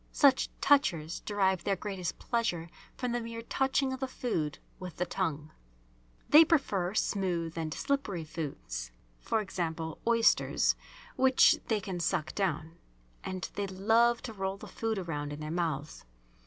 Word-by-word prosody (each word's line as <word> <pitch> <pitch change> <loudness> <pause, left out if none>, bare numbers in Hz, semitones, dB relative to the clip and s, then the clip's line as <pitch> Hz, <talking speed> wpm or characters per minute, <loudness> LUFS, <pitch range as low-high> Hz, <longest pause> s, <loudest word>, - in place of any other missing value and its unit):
Such 275 -3 +4
"touchers" 175 - +3
derive 190 -3 +1
their 200 - +1
greatest 185 -3 -4
pleasure 175 -9 -1 0.3
from 250 -2 -2
the 240 0 -1
mere 230 0 -6
touching 265 +2 +1
of 260 - -5
the 265 - -2
food 165 - -2 0.2
with 180 -2 -7
the 180 - -1
tongue. 155 -6 -2 0.8
They 305 +2 +9
prefer 210 - +1
smooth 175 -6 0
and 160 -1 -3
slippery 215 - -1
foods, 140 - -5 0.3
e.g., 185 -6 -1 0.3
oysters 230 -1 +3 0.4
which 260 0 +5
they 220 -2 +1
can 190 -3 -5
suck 170 -2 -1
down, 165 -4 -2 0.4
and 185 0 -4
they 200 -1 -2
love 225 +5 +3
to 230 - -6
roll 195 -1 -3
the - - -10
food 225 -1 -2
around 145 -5 -3
in 145 - -7
their 155 0 -5
mouths. 160 -4 -2
190 Hz, 145 wpm, -31 LUFS, 165-230 Hz, 0.8 s, They